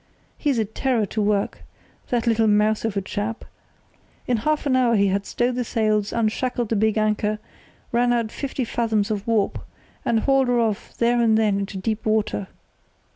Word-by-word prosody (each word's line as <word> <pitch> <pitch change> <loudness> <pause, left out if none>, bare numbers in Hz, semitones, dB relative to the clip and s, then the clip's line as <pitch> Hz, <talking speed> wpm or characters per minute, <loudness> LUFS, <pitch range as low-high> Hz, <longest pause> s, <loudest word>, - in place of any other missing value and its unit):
He's 285 -5 0
a 220 - +1
terror 225 +1 0
to 215 +2 -3
work, 205 -1 0 0.5
that 240 -1 0
little 225 -1 +3
mouse 210 +1 +2
of 215 -3 -2
a - - +1
chap. 210 +4 -4 0.8
In 245 - +1
half 305 +8 0
an 270 -2 +2
hour 245 -2 +3
he 200 -1 +3
had 200 +1 -1
stowed 245 +1 0
the 250 0 -1
sails, 215 -3 0
unshackled 235 +1 -1
the 225 - +1
big 220 +1 +2
anchor, 215 0 +1 0.5
run 240 +1 +2
out 230 -2 0
fifty 270 -2 -3
fathoms 220 -3 0
of 210 0 -3
warp, 220 -3 +1 0.4
and 225 -1 +1
hauled 270 0 +3
her 245 -1 +2
off 220 -2 -2
there 240 +1 +2
and 220 -2 +4
then 210 -3 +2
into 195 -1 -4
deep 215 +3 -2
water. 215 -2 0
220 Hz, 180 wpm, -23 LUFS, 210-240 Hz, 0.8 s, and